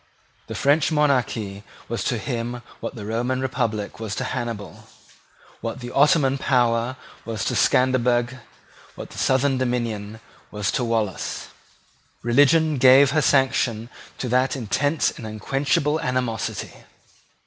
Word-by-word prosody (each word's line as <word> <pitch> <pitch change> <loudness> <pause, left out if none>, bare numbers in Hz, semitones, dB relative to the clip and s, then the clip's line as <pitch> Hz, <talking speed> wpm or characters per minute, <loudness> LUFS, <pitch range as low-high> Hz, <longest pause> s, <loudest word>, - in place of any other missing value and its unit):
The - - -6
French 150 +3 +2
monarchy 125 -9 0 0.3
was 115 - -3
to 120 - 0
him 120 +1 -4 0.2
what - - -6
the 105 -3 -7
Roman 120 +4 -1
republic 120 -7 -2
was 110 -3 -4
to - - -2
Hannibal, 120 -6 -5 0.7
what 115 +3 -5
the 120 0 -7
Ottoman 140 -1 +3
power 120 -2 +1 0.3
was 110 -4 -4
to - - 0
Scanderbeg, 125 -1 +2 0.6
what - - -9
the - - -8
southern 135 0 +2
domination 115 -4 -2 0.3
was 105 -2 -2
to 125 - -1
Wallace. 110 -5 -2 0.7
Religion 145 +4 +4
gave 130 +2 +7
her 155 +2 +2
sanction 125 -4 +1 0.3
to 130 - -3
that 130 +4 +2
intense 145 +5 0
and 110 - -9
unquenchable 135 +7 0
animosity. 125 -3 -2
125 Hz, 125 wpm, -23 LUFS, 115-135 Hz, 0.7 s, gave